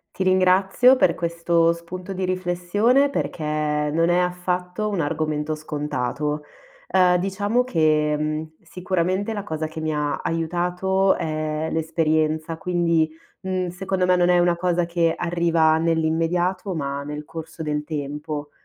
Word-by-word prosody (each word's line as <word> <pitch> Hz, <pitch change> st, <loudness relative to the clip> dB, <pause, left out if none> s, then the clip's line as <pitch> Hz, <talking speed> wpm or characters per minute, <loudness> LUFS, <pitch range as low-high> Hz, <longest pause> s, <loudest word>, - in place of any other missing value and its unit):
Ti 190 Hz, -, -1 dB
ringrazio 190 Hz, +7 st, +4 dB
per 180 Hz, -9 st, +3 dB
questo 170 Hz, 0 st, +1 dB
spunto 180 Hz, +3 st, -7 dB
di 190 Hz, 0 st, -3 dB
riflessione 185 Hz, +9 st, +1 dB
perché 170 Hz, -, -3 dB
non 150 Hz, +1 st, 0 dB
è 175 Hz, 0 st, +3 dB
affatto 180 Hz, +2 st, -1 dB
un 200 Hz, -5 st, -1 dB
argomento 155 Hz, 0 st, -1 dB
scontato. 150 Hz, -3 st, -3 dB, 0.7 s
Uhm 180 Hz, -1 st, +5 dB
diciamo 205 Hz, +6 st, 0 dB
che 155 Hz, -7 st, +2 dB
mhmm 155 Hz, +1 st, -3 dB
sicuramente 185 Hz, +4 st, -2 dB
la 205 Hz, -2 st, -4 dB
cosa 155 Hz, -5 st, -3 dB
che 160 Hz, 0 st, -7 dB
mi 155 Hz, 0 st, -1 dB
ha 150 Hz, -1 st, -1 dB
aiutato 180 Hz, +4 st, 0 dB
è 155 Hz, 0 st, -2 dB
l'esperienza, 160 Hz, 0 st, 0 dB
quindi, 170 Hz, -3 st, +1 dB, 0.3 s
mhmm, 185 Hz, -1 st, -2 dB
secondo 185 Hz, +1 st, -1 dB
me 180 Hz, 0 st, +4 dB
non 175 Hz, 0 st, +3 dB
è 180 Hz, 0 st, +5 dB
una 175 Hz, 0 st, +3 dB
cosa 175 Hz, 0 st, 0 dB
che 170 Hz, -1 st, +1 dB
arriva 170 Hz, -2 st, +2 dB
nell'immediato, 165 Hz, +4 st, 0 dB
ma 140 Hz, -2 st, -3 dB
nel 150 Hz, +1 st, -6 dB
corso 160 Hz, +1 st, -8 dB
del 150 Hz, -1 st, -2 dB
tempo. 150 Hz, 0 st, -5 dB
170 Hz, 140 wpm, -23 LUFS, 155-180 Hz, 0.7 s, Uhm